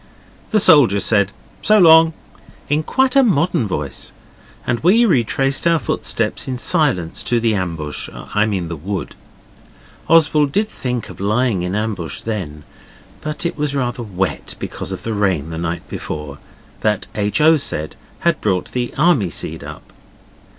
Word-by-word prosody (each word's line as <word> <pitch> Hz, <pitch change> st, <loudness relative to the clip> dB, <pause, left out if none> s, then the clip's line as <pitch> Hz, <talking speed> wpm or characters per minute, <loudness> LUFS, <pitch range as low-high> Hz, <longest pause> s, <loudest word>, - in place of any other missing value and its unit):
The 215 Hz, -, +3 dB
soldier 145 Hz, -, +6 dB
said 100 Hz, -2 st, +2 dB, 0.3 s
'So 215 Hz, -, +4 dB
long!' 165 Hz, -3 st, +7 dB, 0.6 s
in 145 Hz, +2 st, +2 dB
quite 260 Hz, -, +1 dB
a 275 Hz, -, +7 dB
modern 170 Hz, -, +1 dB
voice, 75 Hz, -7 st, -4 dB, 0.5 s
and 120 Hz, -, 0 dB
we 215 Hz, +8 st, +4 dB
retraced 135 Hz, -, +1 dB
our 170 Hz, 0 st, +4 dB
footsteps 115 Hz, -7 st, -2 dB
in 130 Hz, -1 st, -3 dB
silence 125 Hz, -, +1 dB
to 120 Hz, -, +1 dB
the 115 Hz, -1 st, +1 dB
ambush 80 Hz, -7 st, -3 dB
I 105 Hz, +1 st, -1 dB
mean 95 Hz, -5 st, -2 dB
the 85 Hz, -, -5 dB
wood. 95 Hz, +5 st, -5 dB, 0.9 s
Oswald 150 Hz, -3 st, +4 dB
did 210 Hz, +7 st, +1 dB
think 125 Hz, -, -4 dB
of -, -, -11 dB
lying 105 Hz, 0 st, +1 dB
in 90 Hz, +1 st, -3 dB
the -, -, 0 dB
ambush 105 Hz, -7 st, -3 dB
then, 90 Hz, -10 st, -5 dB, 0.6 s
but 155 Hz, +2 st, -4 dB
it 170 Hz, -, -1 dB
was 145 Hz, -1 st, 0 dB
rather 125 Hz, -2 st, -2 dB
wet, 95 Hz, -7 st, -3 dB
because -, -, -5 dB
of -, -, -5 dB
the 115 Hz, -, -3 dB
rain 95 Hz, -7 st, 0 dB
the 80 Hz, -, -5 dB
night 85 Hz, 0 st, -4 dB
before, 75 Hz, -2 st, -6 dB, 0.4 s
that 105 Hz, -2 st, 0 dB
H. 105 Hz, +4 st, 0 dB
O. 160 Hz, +2 st, +6 dB
said 80 Hz, -, -1 dB, 0.3 s
had 170 Hz, -2 st, +1 dB
brought 95 Hz, -4 st, -1 dB
the 120 Hz, -1 st, -2 dB
army 145 Hz, -, +3 dB
seed 80 Hz, -1 st, -4 dB
up. -, -, -11 dB
115 Hz, 160 wpm, -18 LUFS, 95-155 Hz, 0.9 s, long